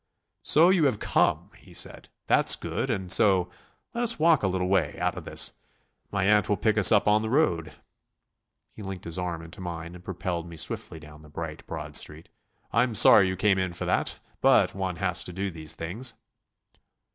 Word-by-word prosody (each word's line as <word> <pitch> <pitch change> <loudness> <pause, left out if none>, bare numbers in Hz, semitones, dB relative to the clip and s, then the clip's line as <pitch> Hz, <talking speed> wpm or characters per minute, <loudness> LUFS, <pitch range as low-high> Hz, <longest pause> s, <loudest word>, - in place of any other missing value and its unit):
"So 165 +4 +5
you 180 -5 +3
have 130 -6 +1
come," - - 0
he - - -17
said; - - -3 0.2
"that's - - +4
good, 135 - -4
and 95 -6 -2
so.... 95 -4 +3 0.4
Let 235 - -3
us 235 -1 +4
walk 160 -2 +3
a 100 - 0
little 90 -1 -1
way... 95 -3 0
out - - -1
of - - -8
this. - - 0 0.6
My 100 -1 -1
aunt 105 -1 +3
will 105 - +1
pick 110 +2 +1
us 105 -3 +7
up 105 -2 +3
on 105 +1 +4
the 110 - -4
road." 90 - 0 1.0
He - - -12
linked 95 -2 -7
his 85 +2 -3
arm 85 -2 -4
into 80 +3 -11
mine 85 -1 -7
and 90 0 -13
propelled 90 -2 -5
me 85 - -11
swiftly 80 0 -5
down 75 0 -14
the 75 - -16
bright, 75 0 -8
broad - - -7
street. 75 +2 -2 0.4
"I'm 125 -3 +1
sorry 100 -1 +7
you 95 - -2
came 95 0 +2
in 95 -2 -2
for 85 - -5
that, - - -1 0.2
but - - +4
one 95 -2 -3
has 90 0 -1
to - - -7
do 95 +2 -4
these 80 -1 -8
things." 110 +9 -4
95 Hz, 200 wpm, -26 LUFS, 85-105 Hz, 1.0 s, us